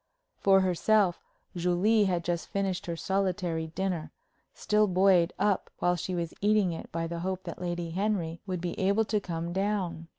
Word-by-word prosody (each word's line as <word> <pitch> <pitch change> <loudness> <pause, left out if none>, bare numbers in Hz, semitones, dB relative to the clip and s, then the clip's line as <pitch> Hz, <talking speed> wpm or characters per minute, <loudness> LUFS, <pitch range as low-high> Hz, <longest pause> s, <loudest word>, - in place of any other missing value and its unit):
For 195 -1 +5
herself, 190 0 +2 0.3
Julie 180 +5 +3
had 175 -3 0
just 170 0 -2
finished 195 -3 -2
her 170 - -2
solitary 180 -3 -1
dinner, 175 -1 -3 0.4
still 210 0 +2
buoyed 185 -2 +4
up 200 -1 +1
while 175 0 +2
she 180 +2 -3
was 170 -1 -3
eating 205 -3 +3
it 165 - -8
by 165 0 -2
the 170 0 -4
hope 185 +1 -3
that 170 0 -7
Lady 175 -1 -3
Henry 175 -3 -1
would 180 -2 -3
be 175 -1 -2
able 200 +3 +2
to 210 0 0
come 170 -2 -4
down. 190 -4 -1
180 Hz, 170 wpm, -29 LUFS, 170-195 Hz, 0.4 s, For